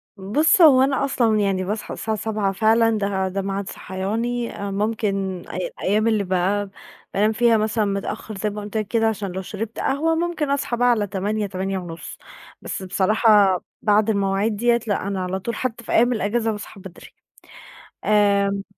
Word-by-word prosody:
بُصّ 290 Hz, -, +2 dB
هو 280 Hz, -6 st, +8 dB
أنا 270 Hz, +1 st, +2 dB
أصلًا 230 Hz, -5 st, +1 dB
يعني 195 Hz, -2 st, 0 dB
باصحى 210 Hz, +4 st, -4 dB
الساعة 220 Hz, -1 st, -3 dB
07:00 210 Hz, -2 st, -1 dB
فعلًا 225 Hz, +2 st, +3 dB
ده 200 Hz, -2 st, -1 dB
ده 195 Hz, +1 st, -2 dB
ميعاد 195 Hz, 0 st, -3 dB
صحياني، 230 Hz, +6 st, -3 dB
آآ، 200 Hz, 0 st, -4 dB
مُمكن 195 Hz, -3 st, -2 dB
أي 185 Hz, -, -4 dB
أيّام 215 Hz, +3 st, +2 dB
اللي 215 Hz, -3 st, +2 dB
بقى 190 Hz, +2 st, 0 dB, 0.4 s
بانام 210 Hz, +2 st, +2 dB
فيها 230 Hz, 0 st, +3 dB
مثلًا 215 Hz, 0 st, 0 dB
متأخّر 200 Hz, +1 st, -4 dB
زي 210 Hz, +2 st, -1 dB
ما 210 Hz, 0 st, -6 dB
قُلت 205 Hz, +1 st, -5 dB
لك 215 Hz, -2 st, -2 dB
كده 225 Hz, +1 st, +1 dB
عشان 205 Hz, -3 st, -2 dB
لو 190 Hz, +1 st, -4 dB
شربت 210 Hz, +4 st, -6 dB
قهوة 320 Hz, +4 st, +1 dB
مُمكن 330 Hz, -3 st, -1 dB
أصحى 280 Hz, -4 st, -1 dB
بقى 245 Hz, +1 st, +3 dB
على 220 Hz, -4 st, +2 dB
08:00 205 Hz, +2 st, -2 dB
08:30 185 Hz, -3 st, -5 dB, 0.4 s
بس -, -, -5 dB
بصراحة 200 Hz, +1 st, +4 dB, 0.2 s
بعد 210 Hz, +1 st, +3 dB
المواعيد 200 Hz, +1 st, +1 dB
ديّة 235 Hz, +2 st, +2 dB
لأ، 200 Hz, -2 st, -1 dB
أنا 195 Hz, -2 st, -2 dB
على 185 Hz, +1 st, -3 dB
طول 230 Hz, +4 st, -4 dB
حتّى 235 Hz, -1 st, -3 dB
في -, -, -7 dB
أيّام 240 Hz, +2 st, +4 dB
الأجازة 225 Hz, +1 st, 0 dB
باصحى 210 Hz, -1 st, -8 dB
بدري، 185 Hz, -2 st, -12 dB, 1.0 s
آمم 200 Hz, -1 st, +2 dB
210 Hz, 175 wpm, -22 LUFS, 195-225 Hz, 1.0 s, هو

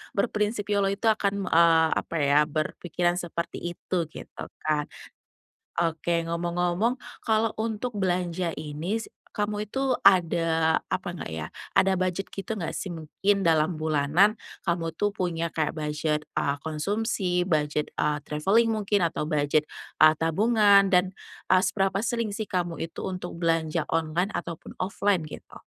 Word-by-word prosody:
berprinsip 210 Hz, 0 st, 0 dB
YOLO 200 Hz, -1 st, +2 dB
itu 200 Hz, +3 st, +2 dB
akan, 200 Hz, -2 st, -1 dB
eee, 165 Hz, -2 st, +5 dB
apa, -, -, -2 dB
ya, 140 Hz, +1 st, +5 dB
berpikiran 175 Hz, +3 st, -1 dB
seperti 170 Hz, -1 st, -4 dB, 0.2 s
itu 175 Hz, -2 st, -2 dB
gitu, 160 Hz, -, -9 dB, 0.2 s
kan. 150 Hz, -1 st, 0 dB, 0.9 s
Oke 170 Hz, 0 st, 0 dB
ngomong-ngomong 175 Hz, +6 st, 0 dB, 0.2 s
kalau 220 Hz, 0 st, +1 dB
untuk 220 Hz, 0 st, -2 dB
belanja 180 Hz, -2 st, -1 dB
ini 155 Hz, +6 st, -3 dB
si 225 Hz, -, -5 dB, 0.2 s
kamu 210 Hz, 0 st, -2 dB
itu 265 Hz, +3 st, -1 dB, 0.2 s
ada, 165 Hz, -3 st, +3 dB
apa 185 Hz, -1 st, -2 dB
nggak 175 Hz, -, -6 dB
ya, 80 Hz, -1 st, -5 dB, 0.3 s
ada 190 Hz, -1 st, +4 dB
budget 185 Hz, +1 st, -2 dB
gitu 220 Hz, +3 st, -4 dB
nggak, 175 Hz, -5 st, -3 dB
sih? -, -, -4 dB
Mungkin 190 Hz, +4 st, -1 dB
dalam 160 Hz, +1 st, +3 dB
bulanan 155 Hz, +6 st, +2 dB, 0.2 s
kamu 165 Hz, -2 st, -1 dB
itu 205 Hz, +4 st, 0 dB
punya 170 Hz, -4 st, -2 dB
kayak 155 Hz, -1 st, -1 dB
budget, 150 Hz, 0 st, -1 dB, 0.2 s
eee, 140 Hz, 0 st, 0 dB
konsumsi, 180 Hz, +3 st, -1 dB
budget, 150 Hz, -3 st, 0 dB
eee, 150 Hz, 0 st, +1 dB
traveling 195 Hz, +11 st, +2 dB
mungkin 205 Hz, -3 st, +1 dB
atau 160 Hz, -2 st, -1 dB
budget, 150 Hz, 0 st, +1 dB, 0.3 s
eee, 155 Hz, 0 st, +7 dB
tabungan 200 Hz, +4 st, +4 dB
dan, 185 Hz, 0 st, +3 dB, 0.4 s
eee, 185 Hz, -, +7 dB
seberapa 195 Hz, +1 st, +1 dB
sering 230 Hz, -1 st, -1 dB
sih, 215 Hz, +1 st, -4 dB
kamu 175 Hz, -2 st, -2 dB
itu 165 Hz, -, -5 dB
untuk 180 Hz, -2 st, -5 dB
belanja 165 Hz, -1 st, 0 dB
online 165 Hz, +4 st, 0 dB
ataupun 170 Hz, -5 st, -6 dB
offline 185 Hz, -3 st, 0 dB
gitu? -, -, -11 dB
175 Hz, 140 wpm, -26 LUFS, 160-200 Hz, 0.9 s, eee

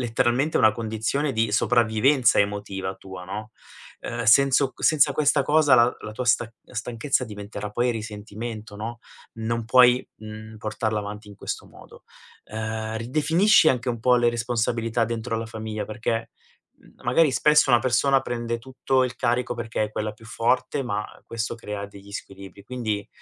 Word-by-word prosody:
letteralmente 120 Hz, +5 st, +1 dB
una 110 Hz, -1 st, +5 dB
condizione 115 Hz, +6 st, -2 dB
di 110 Hz, -3 st, 0 dB
sopravvivenza 120 Hz, +4 st, +3 dB
emotiva 100 Hz, -2 st, -2 dB
tua, 95 Hz, -1 st, -10 dB
no, 105 Hz, +4 st, -6 dB, 0.5 s
uhm, 120 Hz, 0 st, -4 dB
senso 135 Hz, +3 st, +5 dB
c -, -, -14 dB
senza 145 Hz, -3 st, +5 dB
questa 145 Hz, 0 st, +2 dB
cosa, 150 Hz, 0 st, +4 dB
la 120 Hz, 0 st, +4 dB
la 105 Hz, -, -7 dB
tua 125 Hz, +4 st, -4 dB
sta 120 Hz, -1 st, +2 dB
stanchezza 125 Hz, +3 st, -2 dB
diventerà 105 Hz, -1 st, -7 dB
poi 120 Hz, +4 st, +1 dB
risentimento, 110 Hz, 0 st, -7 dB
no, 115 Hz, +3 st, -6 dB, 0.4 s
non 115 Hz, +1 st, -2 dB
puoi, 125 Hz, +2 st, +5 dB
mhmm, 110 Hz, 0 st, -10 dB
portarla 110 Hz, 0 st, -2 dB
avanti 105 Hz, +1 st, -7 dB
in 100 Hz, -, -12 dB
questo -, -, -5 dB
modo. -, -, -16 dB, 0.4 s
Ehm, 110 Hz, 0 st, -4 dB
ridefinisci 155 Hz, -, +4 dB
anche 125 Hz, -2 st, 0 dB
un 120 Hz, -2 st, -2 dB
po' 125 Hz, +2 st, +4 dB
le 120 Hz, -1 st, +3 dB
responsabilità 115 Hz, 0 st, 0 dB
dentro 115 Hz, 0 st, -3 dB
la 115 Hz, -, -4 dB
famiglia, 110 Hz, -1 st, -5 dB
perché, 115 Hz, +1 st, -3 dB, 0.5 s
mhmm, -, -, -21 dB
magari 140 Hz, +6 st, +4 dB
spesso 150 Hz, +1 st, +4 dB
una 120 Hz, -, +6 dB
persona 130 Hz, +3 st, +3 dB
prende 120 Hz, -2 st, -3 dB
tutto 130 Hz, +1 st, 0 dB
il 125 Hz, -1 st, -3 dB
carico 120 Hz, +1 st, 0 dB
perché 115 Hz, -2 st, -2 dB
è 105 Hz, -, -6 dB
quella 110 Hz, 0 st, -2 dB
più 115 Hz, +1 st, -17 dB
forte, 125 Hz, +5 st, 0 dB
ma 105 Hz, -4 st, -2 dB, 0.2 s
questo 115 Hz, 0 st, -3 dB
crea 105 Hz, -3 st, -6 dB
degli 100 Hz, 0 st, -14 dB
squilibri. 100 Hz, 0 st, -9 dB
Quindi, 110 Hz, -4 st, -3 dB
115 Hz, 160 wpm, -24 LUFS, 110-125 Hz, 0.5 s, una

